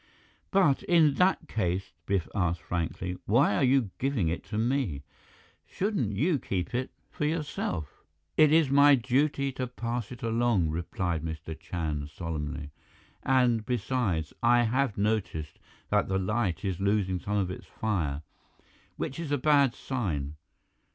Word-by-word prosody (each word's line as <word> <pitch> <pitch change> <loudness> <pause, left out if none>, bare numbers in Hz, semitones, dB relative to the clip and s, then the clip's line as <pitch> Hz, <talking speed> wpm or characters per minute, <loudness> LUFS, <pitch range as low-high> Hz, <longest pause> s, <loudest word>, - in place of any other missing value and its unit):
"But 180 -9 +3
in 160 -4 +4
that 185 +1 +3
case," 95 -3 -1 0.2
Biff 95 -5 0
asked 85 -5 0
frankly, 90 +2 -3
"why 120 +8 +4
are - - +2
you 130 -6 +3
giving 130 - +1
it 85 - -3
to 105 - -4
me? 115 - 0 0.6
Shouldn't 180 - -1
you 150 - +2
keep 95 -3 -3
it 130 +1 -1 0.2
for 150 - -2
yourself?" 150 - -3 0.3
"It 155 -1 +6
is 155 -3 +4
my 140 +1 +7
duty 135 +3 +1
to 130 -1 -3
pass 120 -1 -4
it 120 - -9
along," 115 -7 +2
replied 85 0 -2
Mr. 80 0 -5
Chand 75 -4 -4
solemnly, 75 -2 -5 0.5
"and 125 -4 +3
besides, 110 - -1
I 120 +1 +5
have 125 -1 0
noticed 100 -7 -1 0.3
that 105 0 +3
the 95 - 0
Light 95 0 -1
is 95 -2 -2
losing 100 -2 +1
some 105 +3 -2
of 95 -3 0
its 90 - -8
fire, 80 -10 -2 0.7
which 135 - -4
is 165 -4 -4
a 145 - +2
bad 140 -2 +4
sign. 85 - -3
110 Hz, 145 wpm, -28 LUFS, 85-130 Hz, 0.7 s, my